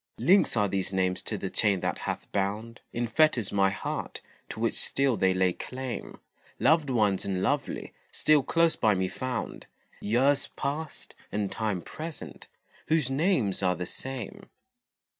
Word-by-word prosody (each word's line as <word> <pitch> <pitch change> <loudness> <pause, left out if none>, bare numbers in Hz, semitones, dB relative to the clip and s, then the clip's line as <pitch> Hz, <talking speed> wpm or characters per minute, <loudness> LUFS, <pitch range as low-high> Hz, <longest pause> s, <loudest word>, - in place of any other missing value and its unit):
Links 190 - +4
are 105 -1 +3
these 95 -1 -1
names 95 -1 0
to - - -3
the - - -4
chain 100 -3 +3
that - - -2
hath - - -4
bound 105 +4 -2
In 120 +1 -1
fetters 120 -3 +3
my 100 -1 +3
heart, 95 - -4 0.3
to - - -6
which - - +1
still 135 -3 +2
they 95 -2 +3
lay 95 -1 +2
claim; 130 +3 -6 0.4
Loved 150 +1 +3
ones 105 -6 +2
and 95 -1 -2
lovely, 140 +6 -1 0.2
still 155 -1 +4
close 165 +4 +2
by 110 -3 +3
me 95 0 0
found, 125 +3 -4 0.3
Years 135 +6 +2
past, 145 +2 -4 0.2
and 105 -1 -1
time 105 -6 -2
present, 160 0 -8 0.4
whose 155 -5 +2
names 135 - +1
are 90 -1 +2
the 90 - -4
same. 135 - -5
115 Hz, 155 wpm, -28 LUFS, 95-140 Hz, 0.4 s, Links